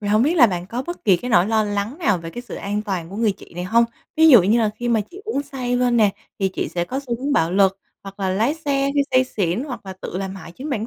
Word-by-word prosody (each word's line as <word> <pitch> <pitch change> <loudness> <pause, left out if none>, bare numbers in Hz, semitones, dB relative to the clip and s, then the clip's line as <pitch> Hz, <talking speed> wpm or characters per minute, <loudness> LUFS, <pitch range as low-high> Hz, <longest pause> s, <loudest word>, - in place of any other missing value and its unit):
thì 205 - -4
hông 215 +2 +4
biết 310 +7 +2
là 255 -7 +8
bạn 180 -4 -3
có 240 +6 -4
bất 345 - -7
kỳ 195 -4 +5
cái 250 +8 -6
nỗi 180 -4 +4
lo 220 -1 +2
lắng 205 +7 -3
nào 210 - +1
về 165 0 -8
cái 240 - -7
sự 245 - -9
an 205 +1 -3
toàn 185 -5 -4
của 195 - -7
người 220 -2 +2
chị 185 - -16
này 175 +1 -4
hông? 230 +5 +4 0.3
Ví 320 +1 +6
dụ 245 - +9
như 210 +6 +3
là 220 -2 +2
khi 240 +2 -3
mà 230 -2 +3
chị 380 - -11
uống 425 -10 -2
say 260 -3 -3
lên 245 -1 +2
nè 215 -3 +4 0.3
thì 195 - +1
chị - - -2
sẽ 175 -1 -2
có 265 +8 -4
xu 245 -4 -3
hướng 280 +2 -2
bạo 165 - +2
lực, 195 0 +3 0.2
hoặc 195 0 -11
là 190 -1 0
lái 225 +10 +1
xe 280 -3 0
khi 285 - +3
say 255 0 +4
xỉn, 205 -1 -2
hoặc 250 -8 -7
là 190 - -5
tự - - -5
làm 190 0 -4
hại 170 -3 -10
chính 275 - -7
bản 225 -5 -2
220 Hz, 310 wpm, -21 LUFS, 195-255 Hz, 0.3 s, dụ